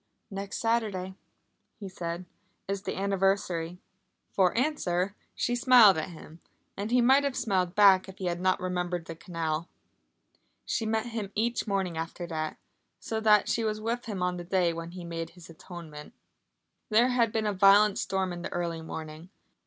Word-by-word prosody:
"Next 195 0 -5
Saturday," 215 -5 -1 0.7
he 200 - -6
said, 175 -1 -5 0.4
"is 195 0 -2
the - - -4
anniversary!" 195 -3 0 0.5
For 185 -2 +3
answer 200 - 0 0.2
she 240 - 0
smiled 245 -5 +7
at 155 - -4
him, 165 -1 -12 0.3
and 200 +2 -4
he 250 +1 +4
might 265 +4 +5
have 280 -2 -1
smiled 185 -5 0
back 195 -2 +6
if 190 - -11
he 190 - -5
had 175 0 -2
not 185 0 +2
remembered 180 -2 -2
the 165 - -7
canal. 165 -1 -3 1.0
She 225 - -1
met 220 +1 0
him 225 -4 -5
each 230 +2 0
morning 190 -5 -1
after 165 +2 -5
that, 155 -2 -4 0.4
so 220 - -3
that 210 -2 +4
she 230 - 0
was 215 -1 -1
with 235 +3 -3
him 200 -5 -3
on 180 0 0
the 175 - -6
day 175 -1 +1
when 165 0 -6
he 175 0 -8
made 165 -1 -5
his 170 -1 -14
atonement. 160 -3 -10 0.8
There 230 +3 +4
had 235 -3 +2
been 220 0 -1
a 210 - +1
violent 200 +2 +5
storm 190 -2 -1
in 175 - -7
the - - -5
early 170 -2 -3
morning. 160 +1 -8
190 Hz, 175 wpm, -28 LUFS, 175-215 Hz, 1.0 s, smiled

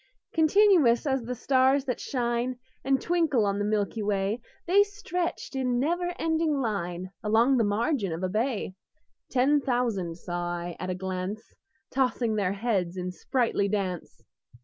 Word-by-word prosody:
Continuous 320 - +4
as 270 -2 +1
the 245 +2 -4
stars 265 +2 +3
that 250 - -2
shine 240 0 -1 0.3
And 270 0 +2
twinkle 320 -10 +2
on 200 0 0
the - - 0
milky 210 +1 -1
way, 205 +2 0 0.2
The 390 +4 +5
stretched 360 -7 -4
in 250 -2 0
never 350 +5 0
ending 320 -1 +1
line 185 -6 -3
Along 230 +5 +4
the 230 - +3
margin 210 - 0
of 165 +3 -4
a - - +2
bay: 220 -1 -1 0.6
Ten 275 +3 +3
thousand 230 -10 -1
saw 175 0 -3
I 170 0 -5
at 185 - -4
a 185 - -1
glance, 190 +3 -4 0.5
Tossing 250 -3 +1
their 200 -3 0
heads 195 -5 -1
in 180 0 -3
sprightly 230 +1 0
dance. 190 -5 -3
235 Hz, 150 wpm, -27 LUFS, 195-275 Hz, 0.6 s, The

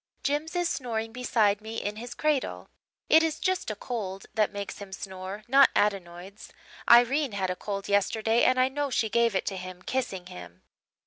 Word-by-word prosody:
"Jims 295 +4 -1
is 350 -1 +1
snoring 225 -6 -3
beside 220 -4 +1
me 220 +1 -7
in 205 +1 -4
his 240 +2 -7
cradle. 305 -3 -1 0.4
It 320 - +6
is 320 -1 -1
just 370 -7 -1
a 215 - -3
cold 200 -4 -5
that 215 -2 +1
makes 200 -1 -6
him 200 -1 -9
snore 190 +2 -7
not 270 +2 +6
adenoids. 195 0 -2 0.4
Irene 245 +2 +5
had 190 -2 -1
a - - -3
cold 200 +1 -5
yesterday 220 +3 +2
and 255 0 +4
I 255 - +5
know 285 +1 -2
she 225 -3 0
gave 235 0 +2
it - - 0
to 195 - -3
him, 185 0 -8
kissing 200 -9 -3
him. 90 - -11
215 Hz, 185 wpm, -27 LUFS, 195-255 Hz, 0.4 s, It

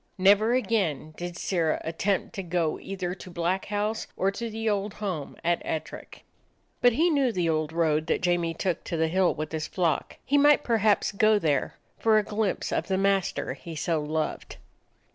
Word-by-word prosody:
Never 205 +5 +5
again 190 - 0
did 175 0 -6
Sirrah 165 -4 0
attempt 185 +7 -1
to 200 - -4
go 170 -3 -1
either 185 -2 -4
to 185 - -10
Black 175 +2 -1
House 210 +2 -2
or 195 +1 +2
to 230 +3 -5
the 225 +1 -4
old 205 -1 -1
home 185 -9 -4
at 170 0 +1
Ettrick. 160 0 -6 0.6
But 245 -1 +5
he 330 +8 +3
knew 275 -5 +2
the 180 -5 0
old 155 -1 0
road 160 -1 +1
that - - 0
Jamie 175 -2 +1
took 180 0 -2
to 170 - -3
the 160 0 +1
hill 185 +1 +2
with 155 0 -4
his 160 -1 -3
flock. 170 -6 -1
He 285 +2 +3
might 295 0 +5
perhaps 220 -3 +2
go 215 +1 +4
there 150 -8 0 0.2
for 220 -1 +4
a 215 - +3
glimpse 210 -1 -2
of - - -1
the 190 -1 0
master 195 -1 0
he 165 -1 -9
so 155 +1 0
loved. 155 +1 -3
185 Hz, 185 wpm, -27 LUFS, 165-215 Hz, 0.6 s, Never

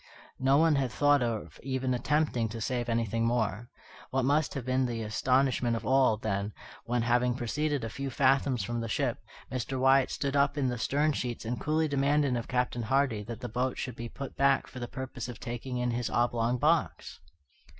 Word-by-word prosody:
No 135 +1 +4
one 160 -1 +4
had 130 -3 0
thought 145 +2 +3
of 115 -3 -3
even 130 -1 -1
attempting 125 -3 0
to 115 +1 -6
save 120 +1 -2
anything 115 -1 0
more. 115 -1 0 0.4
What 130 -1 0
must 145 +2 +1
have 135 -4 -4
been 130 0 +1
the 115 -2 -3
astonishment 125 +2 +1
of 115 - -5
all, 130 -4 +4
then, 100 -1 -2 0.3
when, 120 0 0
having 120 +1 +2
proceeded 145 +3 -1
a - - -2
few 140 +3 -4
fathoms 135 -3 +2
from 120 +3 -3
the 115 - -3
ship, 130 +1 -1 0.3
Mr. 130 +1 -3
Wyatt 135 0 +4
stood 140 0 -2
up 140 +1 +2
in 135 -3 +1
the 120 -2 -3
stern 145 +6 +1
sheets 120 -4 -4
and 120 +2 -3
coolly 155 +1 +1
demanded 140 -1 +2
of 120 -1 -3
Captain 125 -1 -1
Hardy 130 -1 +1
that 115 0 -7
the 125 - -4
boat 125 +3 -1
should 125 -2 -4
be 120 0 -6
put 135 +2 -7
back 140 0 +3
for 130 - -10
the 120 - -4
purpose 130 -2 -6
of 120 - -8
taking 120 +2 -5
in 125 0 0
his 120 0 -2
oblong 120 0 +1
box! 155 +5 0
125 Hz, 200 wpm, -29 LUFS, 120-135 Hz, 0.4 s, No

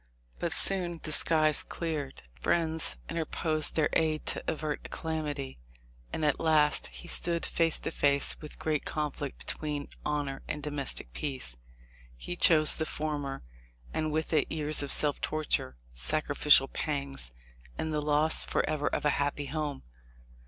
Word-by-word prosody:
But - - -2
soon 175 -3 +4
the 155 - -4
skies 155 -1 +5
cleared. 155 - -5
Friends 160 - -1
interposed 160 -1 -1
their 155 -2 +2
aid 155 -1 0
to - - -3
avert 155 -2 -2
a - - -8
calamity, 150 - -5 0.5
and 155 - -2
at 150 - +1
last 155 -2 +2
he - - -12
stood 170 -1 +2
face 165 -1 +1
to - - -3
face 140 -2 +1
with 150 - -9
the - - -15
great 155 -2 -1
conflict 150 -2 -4
between 150 -2 -3
honor 145 -2 -3
and 150 - -5
domestic 140 - -3
peace. 130 - -2 0.6
He 175 - -6
chose 155 -3 +7
the 160 - -1
former, 145 -3 -4 0.5
and 155 - -1
with 160 +2 -2
it 150 -3 +1
years 155 -1 +4
of 140 - -2
self 145 -2 +3
torture, 150 - -2 0.2
sacrificial 140 - +3
pangs, 140 - -3 0.5
and 160 0 -3
the 150 - -1
loss 150 +1 +3
forever 150 -1 -1
of - - -2
a 150 - +4
happy 145 0 -2
home. 145 -1 -4
150 Hz, 150 wpm, -29 LUFS, 145-155 Hz, 0.6 s, chose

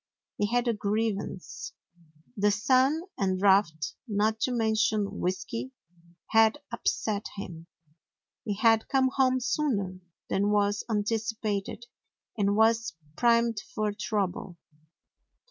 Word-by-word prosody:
He 205 - +2
had 245 +2 0
a 235 - +3
grievance. 210 -2 -3 0.6
The 205 -1 +3
sun 260 +9 +3 0.2
and 190 -2 +1
drought, 190 -5 +3
not 215 +1 +1
to 255 - 0
mention 220 -3 +1
whisky, 230 +8 -3 0.6
had 225 +2 +5
upset 215 -3 -1
him. 170 -4 -8 0.8
He 210 -4 -2
had 225 +1 +3
come 265 -1 +2
home 260 -1 +3
sooner 205 -10 -1 0.3
than 200 +1 +1
was 205 0 +1
anticipated 215 0 -2 0.5
and 200 -1 +1
was 225 +1 +3 0.2
primed 235 -2 +3 0.2
for 215 -1 0
trouble. 195 -4 -3
215 Hz, 110 wpm, -28 LUFS, 200-230 Hz, 0.8 s, had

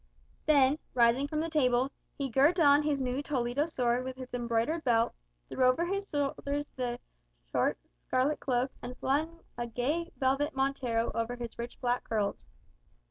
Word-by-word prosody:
Then, 285 -1 +5 0.2
rising 240 +3 +4
from 305 +1 -1
the 325 - -1
table, 260 -3 +2 0.3
he 275 - -1
girt 280 +8 +3
on 290 -2 +6
his 295 -2 0
new 255 +1 -1
Toledo 270 +1 0
sword 250 -5 0
with 260 0 -6
its 255 -1 -9
embroidered 240 +6 0
belt, 230 -2 +2 0.3
threw 260 - -1
over 255 +7 +4
his 395 +2 -3
shoulders 285 0 -1
his 245 -2 -2 0.5
short - - +1 0.3
scarlet 270 +4 +1
cloak, 255 0 0
and 250 +1 -7
flung 315 +5 -1 0.2
a 240 - -2
gay 290 +9 -1
velvet 275 +3 +1
montero 260 -4 0
over 230 +2 -2
his 235 -1 -7
rich 235 +1 -6
black 245 -1 0
curls. 205 - -2
260 Hz, 160 wpm, -30 LUFS, 245-290 Hz, 0.5 s, on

